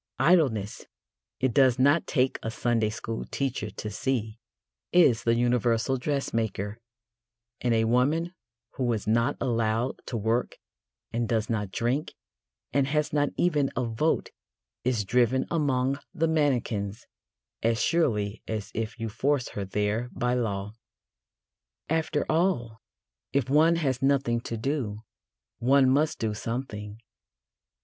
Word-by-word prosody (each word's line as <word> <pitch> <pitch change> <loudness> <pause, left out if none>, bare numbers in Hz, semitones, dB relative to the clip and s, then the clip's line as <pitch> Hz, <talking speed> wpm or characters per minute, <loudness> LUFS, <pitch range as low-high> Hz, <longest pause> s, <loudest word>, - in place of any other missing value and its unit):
Idleness, 135 - +2 0.5
it 130 -2 +1
does 130 -3 +5
not 145 +5 +3
take 130 -1 +1
a 115 - -3
Sunday 115 -1 0
school 110 +1 -5
teacher 135 -5 -2
to 105 0 -6
see, 110 -1 -2 0.5
is 140 -10 +5
the 115 0 +4
universal 120 +1 +2
dressmaker, 115 -6 -2 0.8
and 120 -2 +1
a 110 - +3
woman 145 +9 +1 0.4
who 125 -2 +1
is 110 - -3
not 115 +2 +2
allowed 115 -1 0
to 120 - -2
work 115 +3 0 0.6
and 115 -1 -1
does 110 -1 0
not 105 -4 -2
drink 120 +9 -1 0.6
and 135 0 +2
has 150 +1 0
not 145 -1 +2
even 150 -6 +2
a 125 - 0
vote 120 +8 0 0.5
is 120 -4 0
driven 125 +4 +2
among 140 -4 +1 0.2
the 165 -1 +2
mannequins 120 -10 0 0.6
as 115 0 +1
surely 110 -10 +1
as 110 -2 -4
if 115 +1 -3
you 115 - -2
forced 130 +4 0
her 100 - -4
there 105 +5 -1
by 125 0 0
law. 105 -4 -2 1.2
After 160 -1 0
all, 155 -10 0 0.5
if 135 -2 +1
one 160 +3 +5
has 135 -6 -1
nothing 135 -4 +2
to 115 - -5
do, 110 -4 -2 0.6
one 130 +2 +4
must 150 +3 +2
do 110 -2 -1
something. 105 -2 -5
120 Hz, 130 wpm, -27 LUFS, 110-140 Hz, 1.2 s, does